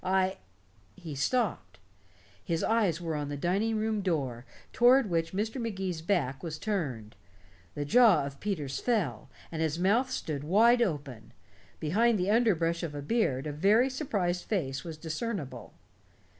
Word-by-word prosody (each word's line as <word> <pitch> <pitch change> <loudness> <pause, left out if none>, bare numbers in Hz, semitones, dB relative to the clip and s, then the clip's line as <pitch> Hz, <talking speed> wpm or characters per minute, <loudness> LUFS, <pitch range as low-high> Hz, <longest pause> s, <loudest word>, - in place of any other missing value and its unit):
I 190 0 +1 0.3
" - - -36 0.3
He 160 -4 -8
stopped. 140 - -1 0.7
His 165 -1 -1
eyes 210 -8 +2
were 165 -2 -3
on 145 -1 -3
the 145 - -4
dining 195 +8 0
room 215 -1 -1
door, 135 -10 -2 0.3
toward 245 -3 +5
which 165 -1 0
Mr. 220 +6 -2
Magee's 190 -7 -3
back 160 -7 0
was 160 -3 -5
turned. 140 - -3 0.6
The 145 - -3
jaw 220 - +5
of 140 0 -8
Peters 155 -10 -3
fell, 170 - -1 0.2
and 160 -1 -3
his 160 0 0
mouth 215 +9 +2
stood 150 - -4
wide 230 +9 +4
open. 145 - -3 0.5
Behind 220 +9 +2
the 185 +2 0
underbrush 175 -8 +2
of 145 -4 -5
beard 165 - +1
a 150 - -3
very 210 - +3
surprised 200 - -2
face 135 -11 -2
was 165 -2 -7
discernible. 160 - -5
175 Hz, 150 wpm, -29 LUFS, 145-215 Hz, 0.7 s, toward